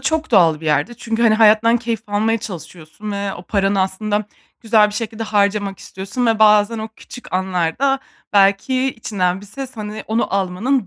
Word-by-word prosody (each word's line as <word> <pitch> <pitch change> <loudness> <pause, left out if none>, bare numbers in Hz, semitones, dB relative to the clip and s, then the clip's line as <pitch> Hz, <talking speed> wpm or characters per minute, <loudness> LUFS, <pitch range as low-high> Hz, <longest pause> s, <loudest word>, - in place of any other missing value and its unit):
çok 315 +2 -1
doğal 165 -7 +4
bir 160 - -7
yerde 150 - +1
çünkü, 230 0 -3
hani, 225 -2 +5
hayattan 220 +1 +5
keyif 230 -2 -3
almaya 220 +2 0
çalışıyorsun 180 +1 -8
ve 200 -1 -3
o 175 - -10
paranı 195 0 0
aslında 205 +2 -1 0.4
güzel 220 -2 +4
bir 205 - -8
şekilde 225 0 -4
harcamak 200 -2 0
istiyorsun 200 +6 -4
ve 225 -1 +2
bazen 210 +1 +4
o 220 0 -5
küçük 245 - -12
anlarda 190 +9 0 0.3
belki 200 +6 +3
içinden 185 -5 -1
bir 205 - -13
ses, 260 +4 -7
hani, 210 0 -6
onu 220 -2 -1
almanın 200 +5 0
210 Hz, 170 wpm, -19 LUFS, 195-230 Hz, 0.4 s, hani